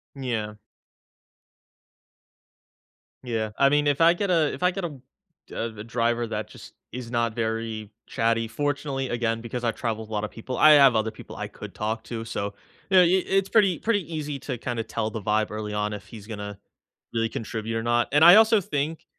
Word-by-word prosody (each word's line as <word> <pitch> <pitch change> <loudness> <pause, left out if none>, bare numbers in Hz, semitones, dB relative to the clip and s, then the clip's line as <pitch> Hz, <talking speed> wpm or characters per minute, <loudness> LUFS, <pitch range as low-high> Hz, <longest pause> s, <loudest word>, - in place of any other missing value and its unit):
N 135 - -8
yeah. 110 -4 -2 2.7
Yeah. 110 -3 -2
I 140 - +5
mean, 145 +1 +2
if 145 +2 +1
I 165 +1 +7
get 200 +3 -2
a 165 -4 +2
if - - -6
I 180 - +4
get, 185 -1 -4
uh, - - -2 0.6
a - - -3
a - - -5
driver 115 +1 0
that - - -4
just - - -13 0.2
is 125 -1 -7
not 115 -2 0
very 110 -2 -3 0.2
chatty, 115 -1 0
fortunately 140 +1 -2
again 115 -1 -1
because 120 +1 -5
I've 115 -2 0
traveled 110 -1 -3
with - - -21
a - - -5
lot 105 0 -1
of 105 - -4
people, 125 +3 -6
I 155 - +7
have 140 -5 +7
other 110 0 +1
people - - -11
I - - -4
could - - -10
talk 110 +1 -3
to 115 -1 -5
so 100 -2 -3
uh - - -7 0.4
eh 185 - +9
i 180 +1 +4
it's 195 0 +1
pretty 195 -6 +3
pretty 205 -7 -1
easy 150 -2 -4
to 130 -1 -5
kinda 120 -1 -3
tell 110 -1 -3
the 110 0 -6
vibe 105 +2 0
early 105 -1 -4
on 105 0 -1
if 105 0 -8
he's 105 -1 -11
gonna 105 -2 -7 0.5
really 115 -1 0
contribute 115 0 -4
or 115 - -3
not, 120 -1 +2
and 145 +2 +5
I 175 +3 +11
also 220 0 +6
think, 155 0 -3
115 Hz, 205 wpm, -25 LUFS, 110-145 Hz, 2.7 s, I